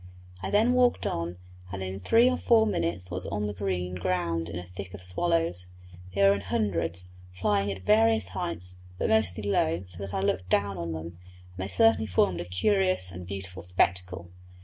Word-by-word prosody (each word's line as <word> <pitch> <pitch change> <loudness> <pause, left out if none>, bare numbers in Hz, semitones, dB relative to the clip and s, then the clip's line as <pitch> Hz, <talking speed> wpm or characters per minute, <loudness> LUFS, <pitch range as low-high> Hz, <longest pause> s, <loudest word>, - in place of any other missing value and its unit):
I - - -3
then 220 +4 +3
walked 250 -1 +3
on, 85 +1 -2 0.3
and 95 -1 -4
in 95 +1 -4
three 225 - +4
or 255 - +3
four 225 -3 +4
minutes 90 - -1
was 90 +1 -4
on 105 +1 -2
the 105 - -3
green 90 -2 -2
ground 85 -2 -1
in - - -6
the 90 - -4
thick 90 +1 -8
of 100 - -11
the - - -4
swallows. 130 - 0 0.5
They 100 - +3
were 100 0 +7
in 100 - -3
hundreds, 90 -3 -1 0.3
flying 100 +1 +1
at 95 -1 -7
various 110 -2 +4
heights, 90 -1 -4 0.2
but - - 0
mostly 105 -2 +2
low, 90 -4 +1
so 90 -1 -9
that 100 -1 -5
I - - 0
looked 90 -1 -1
down 100 0 +2
on 85 -1 -3
them, 80 0 -5 0.5
and 90 - -19
they 95 +1 -3
certainly 110 +3 +3
formed 90 -1 +2
a - - -5
curious 185 - +1
and 90 0 -8
beautiful 95 -1 -6
spectacle. 90 -1 0
95 Hz, 195 wpm, -28 LUFS, 90-105 Hz, 0.5 s, were